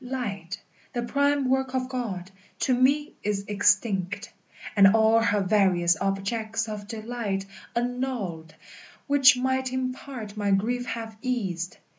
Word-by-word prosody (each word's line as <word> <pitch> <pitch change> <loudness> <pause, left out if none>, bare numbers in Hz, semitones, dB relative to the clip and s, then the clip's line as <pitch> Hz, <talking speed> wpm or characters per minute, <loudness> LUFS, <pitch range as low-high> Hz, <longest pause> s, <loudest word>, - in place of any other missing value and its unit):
Light, 205 -8 -4 0.3
the 240 - -2
prime 280 +2 +1
work 265 0 0
of 255 -1 0
God, 210 -8 -4 0.3
to 290 -7 +2
me 280 +5 +2
is 200 -1 -2
extinct, 205 0 +1 0.4
And 195 0 +7
all 220 +1 +5
her 210 -2 +2
various 185 -3 +3
objects 220 +3 -1
of 210 -1 -6
delight 215 -3 -3 0.3
Annulled, 235 -10 -3 0.5
which 280 -2 +6
might 260 0 0
in 255 0 -1
part 245 -6 -8
my 205 -1 -1
grief 240 +6 +1
have 225 -1 -5
eased. 190 -9 -2
225 Hz, 130 wpm, -26 LUFS, 200-255 Hz, 0.5 s, And